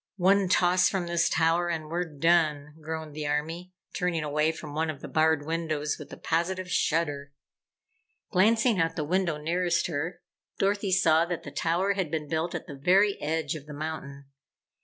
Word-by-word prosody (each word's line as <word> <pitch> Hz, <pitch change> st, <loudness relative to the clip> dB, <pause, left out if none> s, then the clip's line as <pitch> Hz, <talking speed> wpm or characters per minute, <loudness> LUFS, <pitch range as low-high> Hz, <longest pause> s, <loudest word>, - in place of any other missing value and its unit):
"One 195 Hz, +1 st, +3 dB
toss 180 Hz, +1 st, +4 dB
from 190 Hz, -3 st, -2 dB
this 170 Hz, -1 st, +1 dB
tower 165 Hz, +1 st, +2 dB
and 160 Hz, -2 st, -3 dB
we're 175 Hz, +3 st, -2 dB
done!" 155 Hz, -2 st, +2 dB
groaned 160 Hz, -1 st, -5 dB
the 150 Hz, -1 st, -3 dB
Army, 160 Hz, +5 st, -3 dB, 0.2 s
turning 175 Hz, -3 st, -1 dB
away 150 Hz, +1 st, +1 dB
from 155 Hz, -2 st, -9 dB
one 160 Hz, +1 st, -1 dB
of 150 Hz, -3 st, -5 dB
the -, -, -7 dB
barred 160 Hz, -2 st, +2 dB
windows 155 Hz, -2 st, -2 dB
with -, -, -10 dB
a -, -, -8 dB
positive 180 Hz, +3 st, -1 dB
shudder. 145 Hz, -5 st, 0 dB, 1.0 s
Glancing 225 Hz, +3 st, +3 dB
out 165 Hz, 0 st, +1 dB
the 155 Hz, -, -2 dB
window 170 Hz, 0 st, 0 dB
nearest 175 Hz, +3 st, 0 dB
her, 165 Hz, +2 st, -3 dB, 0.4 s
Dorothy 200 Hz, 0 st, 0 dB
saw 165 Hz, -3 st, +4 dB
that 175 Hz, -1 st, -4 dB
the -, -, -8 dB
tower 180 Hz, +5 st, +1 dB
had 190 Hz, -5 st, -2 dB
been 155 Hz, -1 st, -3 dB
built 160 Hz, +2 st, -2 dB
at -, -, -5 dB
the 150 Hz, -, -9 dB
very 190 Hz, +9 st, +3 dB
edge 155 Hz, 0 st, -1 dB
of 150 Hz, -2 st, -8 dB
the 150 Hz, -, -8 dB
mountain. 145 Hz, -2 st, -6 dB
165 Hz, 180 wpm, -27 LUFS, 155-180 Hz, 1.0 s, toss